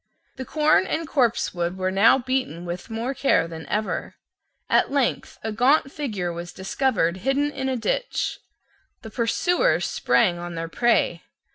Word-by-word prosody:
The 260 - -5
corn 305 +3 +3
and 325 0 -2
copsewood 190 - 0
were 185 0 -1
now 200 +7 +5
beaten 255 - -2
with 175 +4 -6
more 230 +4 -3
care 270 -11 +2
than 160 -1 -9
ever. 210 +1 -2 0.5
At - - +3
length 275 -3 -1
a 220 - -2
gaunt 265 +5 +3
figure 210 - -3
was 170 +1 -7
discovered 190 -3 0
hidden 270 +8 0
in 265 -2 -3
a 260 - -1
ditch. - - -2 0.6
The 220 - -9
pursuers 350 - +1
sprang 175 -1 +2
on 175 0 -6
their 165 0 -4
prey. 225 -5 +1
230 Hz, 150 wpm, -24 LUFS, 175-270 Hz, 0.6 s, now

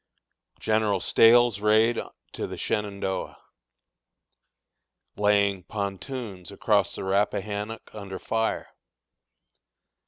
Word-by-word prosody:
General 110 -3 +1
Stahel's 115 +1 +5
Raid 110 +2 +3 0.3
to - - -4
the - - -7
Shenandoah. 100 -2 -3 1.8
Laying 100 -2 +2
Pontoons 100 0 -6
across 100 -1 +1
the - - -5
Rappahannock 105 +2 -1
under 100 -3 -7
Fire. 115 0 -2
105 Hz, 75 wpm, -26 LUFS, 100-110 Hz, 1.8 s, Stahel's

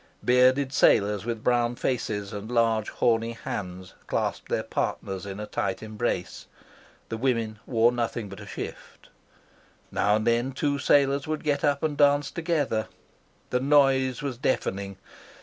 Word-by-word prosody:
Bearded 130 +2 +4
sailors 100 -4 +3
with 115 -2 -3
brown 120 -1 +2
faces 110 -5 -2
and 105 +3 -6
large 115 -2 +2
horny 115 0 +1
hands 95 -5 -6
clasped - - -2
their - - 0
partners 95 0 -3
in 100 +1 -6
a 105 - -4
tight 95 -1 -3
embrace. 110 -4 -3 0.6
The 115 - -3
women 115 -4 -1
wore 115 -1 +4
nothing 120 -2 -2
but 100 0 -10
a 105 - -10
shift. - - -8 0.8
Now 105 +1 +2
and 110 0 -1
then 120 +3 +1
two 140 +1 0
sailors 140 +1 +3
would 155 -1 -3
get 145 -2 0
up 145 0 +1
and 155 -2 0
dance 145 0 +3
together. 155 -10 -1 0.6
The 125 - +2
noise 135 -1 +3
was 135 -4 -3
deafening. 100 -6 -1
120 Hz, 150 wpm, -26 LUFS, 105-135 Hz, 0.8 s, Bearded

